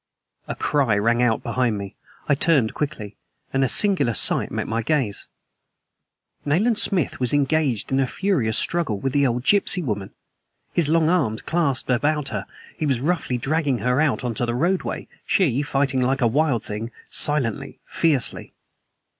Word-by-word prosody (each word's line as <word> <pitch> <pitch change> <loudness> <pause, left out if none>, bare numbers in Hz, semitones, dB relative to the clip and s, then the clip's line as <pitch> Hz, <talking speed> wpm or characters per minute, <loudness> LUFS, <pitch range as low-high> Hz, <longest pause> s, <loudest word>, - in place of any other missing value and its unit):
A - - -4
cry 135 -8 +1
rang 115 +3 +1
out 120 -2 +1
behind 125 -4 -1
me. 100 -1 -7 0.3
I - - +3
turned 140 -5 +2
quickly. 120 -9 -5 0.4
And 135 0 +2
a 130 - +1
singular 165 - +2
sight - - +3
met - - -4
my 115 +1 -1
gaze. 125 -5 -2 1.2
Nayland 210 +10 +1
Smith 185 - +1
was 125 0 -1
engaged 140 -6 0
in 135 - +2
a 135 - +1
furious 135 - 0
struggle 165 -12 0
with 135 +3 -3
the 140 -1 +3
old 120 0 -2
gypsy 195 0 +3
woman! 100 -7 -3 0.6
His 165 -4 +1
long 160 0 +3
arms 140 -11 0
clasped 145 -7 -1
about 145 +3 0
her, 100 -2 -5 0.3
he 155 - -2
was 130 -4 +1
roughly 145 -3 -1
dragging 140 +1 0
her 125 +4 0
out 155 -5 0
into 120 -2 -2
the 120 0 -1
roadway, 175 +8 -1 0.2
she 140 -9 +1
fighting 135 -2 0
like 135 +2 0
a - - +3
wild 130 -1 +1
thing 110 +2 -5 0.2
silently, 140 -2 +2
fiercely. 150 -7 0
135 Hz, 165 wpm, -22 LUFS, 120-155 Hz, 1.2 s, I